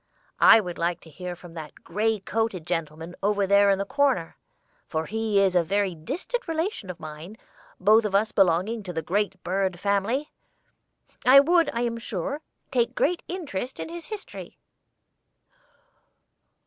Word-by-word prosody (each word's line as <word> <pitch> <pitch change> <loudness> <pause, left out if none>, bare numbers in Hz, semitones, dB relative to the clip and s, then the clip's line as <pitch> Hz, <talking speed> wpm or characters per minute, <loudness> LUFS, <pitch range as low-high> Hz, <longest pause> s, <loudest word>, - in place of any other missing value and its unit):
I - - +8
would 180 -5 -5
like 170 +1 0
to 160 - -15
hear 180 +3 -6
from 175 -1 -13
that 155 -3 -10
gray 215 +5 0
coated 210 -5 -2
gentleman 165 0 -4
over 200 0 +2
there 200 +1 +5
in 195 - +3
the 200 - -2
corner, 265 - +1 0.5
for 160 0 -2
as - - -11
he 220 -2 +1
is 190 -2 +3
a 175 - +6
very 195 +2 0
distant 350 - -4
relation 325 - -2
of 180 - -6
mine, 155 +6 -9 0.4
both 215 +4 +5
of 205 -2 -1
us 210 +2 +2
belonging 195 +4 +2
to 185 -3 -7
the 160 -1 -3
great 195 +1 -1
bird 190 -1 -1
family, 205 +9 0 0.9
I 265 +2 +9
would, 335 +4 +4
I 235 - -2
am 235 -1 -1
sure, 230 - -4 0.3
take 245 -1 +1
great 340 +3 +1
interest 275 - -5
in - - -5
his 340 0 -8
history." 430 -2 -8
200 Hz, 160 wpm, -26 LUFS, 175-235 Hz, 0.9 s, I